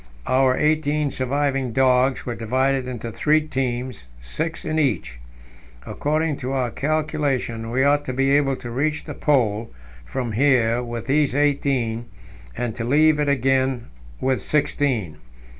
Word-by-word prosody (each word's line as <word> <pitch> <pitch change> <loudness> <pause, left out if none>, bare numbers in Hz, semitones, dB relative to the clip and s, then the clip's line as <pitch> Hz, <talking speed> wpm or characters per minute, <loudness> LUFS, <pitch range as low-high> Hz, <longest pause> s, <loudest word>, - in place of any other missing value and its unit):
Our 130 0 +3
eighteen 150 -1 +1
surviving 135 -1 -1
dogs 130 +1 +2
were 120 - -2
divided 130 +3 0
into 120 -2 -5
three 155 +6 +2
teams, 125 - -3
six 160 - -4
in 155 0 0
each. 105 - -1 0.7
According 155 0 -1
to 130 +1 -4
our 125 -3 0
calculation, 145 -7 -1
we 130 +3 +1
ought 145 +1 +3
to 130 - -3
be 135 +1 +1
able 140 -1 +3
to 120 -2 -8
reach 150 +5 -1
the - - -7
Pole 115 -6 +1 0.3
from 120 - -4
here 120 -1 +3
with 120 -1 -5
these 145 -1 +2
eighteen, 135 -5 0 0.5
and 120 -2 -2
to 115 - -3
leave 150 +5 +4
it 145 -1 +1
again 130 -2 +1 0.3
with 130 -1 0
sixteen. 130 - 0
130 Hz, 140 wpm, -22 LUFS, 120-145 Hz, 0.7 s, leave